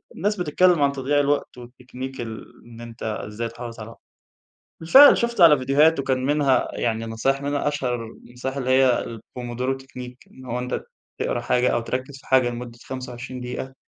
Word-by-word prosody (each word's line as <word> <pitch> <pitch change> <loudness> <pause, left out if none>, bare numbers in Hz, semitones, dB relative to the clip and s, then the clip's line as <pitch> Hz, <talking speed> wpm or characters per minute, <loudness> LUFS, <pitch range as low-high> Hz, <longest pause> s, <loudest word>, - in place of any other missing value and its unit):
ناس 205 +4 0
بتتكلم 180 -1 +2
عن 140 - +3
تضييع 140 +1 0
الوقت 145 -2 0
والتكنيك 125 +1 -8
ال 110 -1 -7 0.2
إن 120 0 -12
أنت 115 0 -10
ازاي 110 +1 -4
تحافظ 115 0 -9
على 110 +1 -8
وقتك. - - -15 0.8
بالفعل 265 - +8
شُفت 235 -4 -1
على 160 -4 +8
فيديوهات 140 +4 +3
وكان 130 -1 -1
منها 140 -3 +2
يعني 115 -1 -2
نصايح 125 +5 -1
منها 145 +1 -1
أشهر 135 -4 -1
النصايح 125 +4 -8
اللي 130 -1 -3
هي 130 -1 +3
الPomodoro 120 +3 -5
Technique 125 -1 -10
إن 130 - -14
هو 125 0 -3
أنت 125 +1 -3 0.4
تقرا - - -2
حاجة 125 0 +2
أو 120 - 0
تركز 130 +3 -4
في - - -20
حاجة 130 -2 +4
لمدة 120 0 -7
25 125 -1 -7
دقيقة 125 0 -4
بعد 130 0 -14
130 Hz, 175 wpm, -23 LUFS, 120-140 Hz, 0.8 s, بالفعل